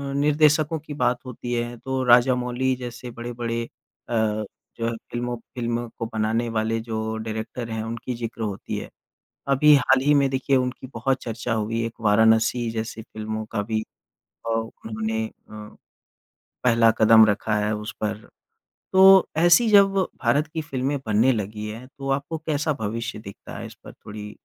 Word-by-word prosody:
निर्देशकों 150 +2 +3
की 150 -1 -9
बात 125 -2 +1
होती 120 -1 -5
है, 120 0 -2
तो 130 +2 -3
राजामौली 125 +1 +3
जैसे 125 -1 -7
बड़े-बड़े 120 0 -4 0.5
अ, 120 - -1 0.6
जो 115 - -2
है - - 0 0.2
फिल्मों 120 0 -2 0.2
फ़िल्मों 120 0 -2
को 115 - -2
बनाने 110 +2 0
वाले 110 0 -1
जो 110 -1 -3
डायरेक्टर 110 +2 -5
हैं, 110 -1 -3
उनकी 115 +2 -5
ज़िक्र 115 0 -5
होती 100 -2 -4
है। - - -6 0.7
अभी 150 +2 +6
हाल 135 -1 +3
ही 145 0 +4
में 135 - +2
देखिए 135 0 +1
उनकी 125 0 -2
बहुत 130 +3 0
चर्चा 115 0 -3
हुई 115 +1 -1
है। 115 - 0
एक 115 - -7
वाराणसी 110 +2 +3
जैसी 110 0 -4
फिल्मों 110 0 -5
का 105 -2 0
भी 110 +1 -1 0.7
अ, - - -1
उन्होंने 110 -1 -3
अ, - - -11 1.3
पहला 115 -2 +5
कदम 110 0 +8
रखा 105 0 0
है 105 - 0
उस 105 +1 -6
पर। 105 0 -3 0.7
तो 190 0 +5 0.4
ऐसी 175 +8 +5
जब 200 -1 +6 0.3
भारत 150 +2 +2
की 160 - -1
फिल्में 135 0 -2
बनने 110 +5 +3
लगी 105 -1 -4
है, 115 +4 -8
तो 135 0 -6
आपको 140 +4 -2
कैसा 155 0 -1
भविष्य 115 +1 -3
दिखता 100 -2 -10
है? - - -6
इस - - -11
पर - - -10
थोड़ी 105 0 -9
115 Hz, 165 wpm, -24 LUFS, 110-130 Hz, 1.3 s, कदम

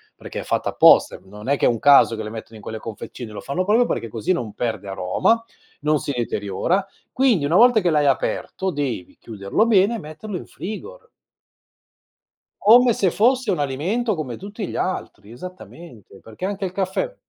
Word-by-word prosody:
perché - - -7
è - - -8
fatta - - -1
apposta, - - +5
e - - -20
non 105 +6 -9
è 140 - +3
che - - +1
è - - +5
un 115 -2 -1
caso, 140 -5 +6
che 110 - -5
le 105 - -6
mettono 110 0 -9
in 105 - -13
quelle 110 - -6
confezioni, 115 +1 -8
lo 105 - -7
fanno 160 +7 -2
proprio 225 +5 +4
perché 115 - -2
così 115 - -1
non 115 - -4
perde 110 -3 -3
aroma, 95 - +1 0.4
non 150 +1 +2
si 145 - -4
deteriora; 120 - -1 0.3
quindi 245 - +2
una 160 +5 +1
volta 240 -1 +6
che 180 - +1
l'hai 150 -2 +2
aperto 190 +7 -1
devi 135 - -4
chiuderlo 105 - -1
bene 205 +1 +4
e 225 - -4
metterlo 180 +5 -7
in - - -9
frigo 335 - -8 1.5
come 240 +3 +6
se 190 -5 +1
fosse 250 +1 +2
un 180 - -1
alimento 180 - -1
come 130 -8 -5
tutti 205 +1 -6
gli - - -7
altri, 110 - -4
esattamente, 160 - -12
perché 110 +11 -8
anche 200 0 -3
il 185 - -4
caffè 195 - -2
160 Hz, 190 wpm, -22 LUFS, -, 1.5 s, caso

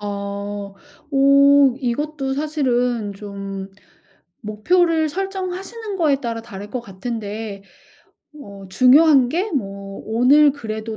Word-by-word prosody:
어. 200 0 -5 0.4
어 275 -1 +5
이것도 270 +2 -2
사실은 250 -7 -1
좀 195 -1 -7 0.7
목표를 315 - +1
설정하시는 390 +4 -5
거에 290 -5 +1
따라 230 -3 -4
다를 205 -2 -10
것 250 - -3
같은데 210 -1 -6 0.8
어 200 -4 -11
중요한 265 +4 +5
게 370 +8 -1
뭐 195 -6 -5
'오늘 270 +6 +4
그래도 220 -4 -6
245 Hz, 210 characters per minute, -20 LUFS, 205-295 Hz, 0.8 s, 어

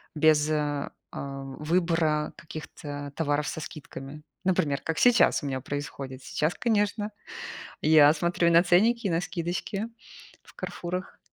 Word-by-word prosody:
без, 155 0 +4
а, 145 -2 -1 0.2
а, 135 0 -5
выбора 155 +1 0
каких-то 145 -3 -7
товаров 145 -2 0
со 160 - -4
скидками. 150 -1 -8 0.2
Например, 155 -7 +1
как 165 0 -3
сейчас 240 -9 +5
у - - -3
меня 130 -1 -2
происходит. 135 -1 -5
Сейчас, 155 +3 0
конечно, 210 -2 0 0.7
я 150 -1 +7
смотрю 170 +2 +1
и - - +2
на 170 +1 +7
ценники, 215 +6 +3
на 170 -1 +1
скидочки 185 +5 -3 0.6
в - - -18
"Карфурах". 180 +2 -5
155 Hz, 135 wpm, -27 LUFS, 145-175 Hz, 0.7 s, я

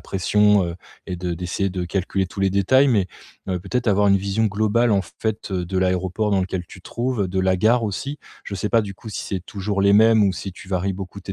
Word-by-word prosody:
pression, 105 +1 +2
heu, 85 0 -4 0.3
et 90 - -4
de 90 -1 -3
d'essayer 90 +3 -2
de 90 -1 -3
calculer 95 +1 -1
tous 95 +2 -7
les 95 - +2
détails, 130 +9 +4
mais, 105 -7 +2 0.4
heu, 90 -2 -1
peut-être 125 +5 -2
avoir 100 0 +3
une 100 - +5
vision 100 +3 0
globale, 110 +3 +1
en 100 -1 +2
fait, 105 +2 -4
de 90 +1 -2
l'aéroport 95 +3 0
dans 95 -1 +2
lequel 95 -1 -3
tu 90 - -13
te - - -37
trouves, 120 -6 -1
de 95 +1 -1
la 95 0 +2
gare 115 +4 +3
aussi. 140 +8 -4 0.3
Je 100 - -5
sais 100 +2 -2
pas, 115 - +4
du 100 -2 -7
coup, 110 - -11
si - - -4
c'est 95 -2 -3
toujours 100 -1 -3
les 100 0 +5
mêmes, 110 +1 +6
ou 95 - +2
si 95 - -6
tu 95 - -13
varies 95 +1 -1
beaucoup 95 +1 -8
tes 95 - -6
100 Hz, 245 wpm, -22 LUFS, 95-105 Hz, 0.4 s, mêmes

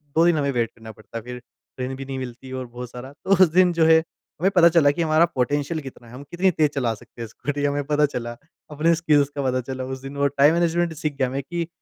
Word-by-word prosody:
2 165 +1 +5
दिन 170 -2 +3
हमें 140 -1 0
वेट 120 -3 -1
करना 110 -1 -11
पड़ता 110 +2 -9
फिर। 125 +1 -8 0.4
ट्रेन 130 +1 -4
भी 135 0 -7
नहीं 135 0 -5
मिलती 130 +1 -8
और 130 -1 -4
बहुत 120 +1 -8
सारा, 125 +3 -9
तो 175 +6 -7
उस - - +6
दिन 180 +1 +4
जो 165 -1 +3
है 160 0 +7
हमें 170 +2 -4
पता 170 -1 +7
चला 160 -4 +4
कि 170 - -3
हमारा 160 0 +4
पोटेंशियल 145 +5 0
कितना 130 -3 -11
है 115 - -14
हम 130 +3 -9
कितनी 185 +2 +2
तेज़ 155 -3 +2
चला 125 -6 -1
सकते 115 +1 -13
हैं 115 - -4
स्कूटी 145 +6 -4
हमें 145 0 0
पता 150 0 +4
चला 120 -1 -3 0.4
अपने 160 +3 +2
स्किल्स 150 -4 +2
का 140 - -2
पता 130 0 0
चला 130 0 -4
उस - - -12
दिन 135 +1 -8
वो 140 - +3
टाइम 140 +2 +4
मैनेजमेंट 170 0 +1
सीख 155 -1 -3
गया, 130 -2 +1
मैं 135 +2 -3
कि 170 +2 -4
140 Hz, 260 wpm, -23 LUFS, 125-160 Hz, 0.4 s, है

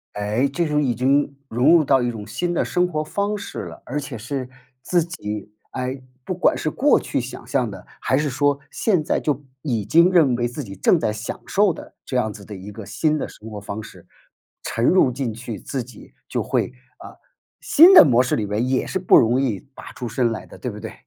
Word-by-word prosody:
哎， 105 +6 0
这 170 +5 -1
种 150 -1 +1
已 125 -5 0
经 140 +3 +1
融 120 +8 +4
入 165 - +5
到 135 -2 +3
一 120 - 0
种 110 -3 -6
新 175 +11 -2
的 - - +1
生 180 0 +1
活 155 -3 -2
方 200 +6 -2
式 200 - -7
了， - - -11
而 145 +4 -3
且 135 -4 -6
是 130 +3 -4 0.3
自 175 +4 +1
己 105 - -6 0.2
哎， 130 +1 -4 0.2
不 185 - -3
管 180 - +2
是 155 - -1
过 280 - +3
去 - - -2
想 125 +1 -7
象 125 -4 0
的， 95 -2 -10
还 130 - +1
是 150 +1 0
说 145 +2 +1
现 185 -8 +1
在 - - 0
就 145 -1 -2 0.2
已 120 -7 -1
经 170 - +5
认 165 -8 +4
为 120 0 0
自 120 +5 -6
己 100 -5 -9
正 100 - +3
在 155 - 0
享 110 +2 -5
受 200 -2 +2
的 - - -12
这 - - -5
样 110 -4 +1
子 100 -1 -11
的 105 - -8
一 95 +2 -9
个 105 0 -9
新 150 +10 0
的 - - -3
生 110 - -12
活 105 -2 -7
方 100 +1 -6
式， - - -14 0.6
沉 115 - -1
入 175 -6 +4
进 125 -2 -3
去， 115 -2 -7
自 135 -3 -4
己 120 -2 -15 0.2
就 - - -1
会 - - 0 0.3
啊， - - -12 0.4
新 340 +6 +7
的 370 - +11
模 125 -3 +4
式 125 - 0
里 110 - -1
面 105 +5 -1
也 130 -1 0
是 190 - -2
不 180 - +6
容 120 +3 +3
易 115 -8 -1 0.2
拔 - - -10
出 125 - -6
身 115 +1 0
来 110 - -5
的， - - -14
对 - - -4
不 - - -9
对？ - - -7
130 Hz, 250 characters per minute, -22 LUFS, 110-155 Hz, 0.6 s, 的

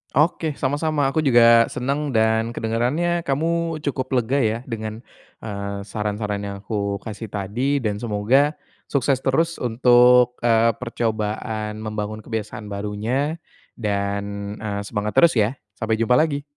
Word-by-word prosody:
Oke, 160 +1 +2
sama-sama. 145 +1 0
Aku 155 +3 0
juga 115 -3 +6
senang, 140 +3 -2
dan 110 0 +2
kedengarannya 130 +10 0
kamu 165 +3 -1
cukup 135 -2 -3
lega 130 +3 0
ya, 110 +1 +1
dengan, 110 -1 -5 0.4
eee, 100 -1 -5
saran-saran 105 0 -3
yang 100 -1 -5
aku 100 -1 -3
kasih 110 0 -8
tadi, 120 +8 -1
dan 105 -4 -1
semoga 115 +6 +2 0.4
sukses 135 -1 +1
terus 165 +5 +1
untuk, 125 +1 +5
eee, 115 -1 +4
percobaan 110 -2 -3
membangun 110 0 -4
kebiasaan 110 -1 -5
barunya, 110 +10 -2 0.4
dan, 100 0 -3
eee, 100 -2 -3
semangat 105 +1 -3
terus 170 -1 +6
ya. 110 +5 +1 0.2
Sampai 110 0 +1
jumpa 115 +4 +3
lagi. 145 -3 +1
115 Hz, 130 wpm, -22 LUFS, 105-135 Hz, 0.4 s, juga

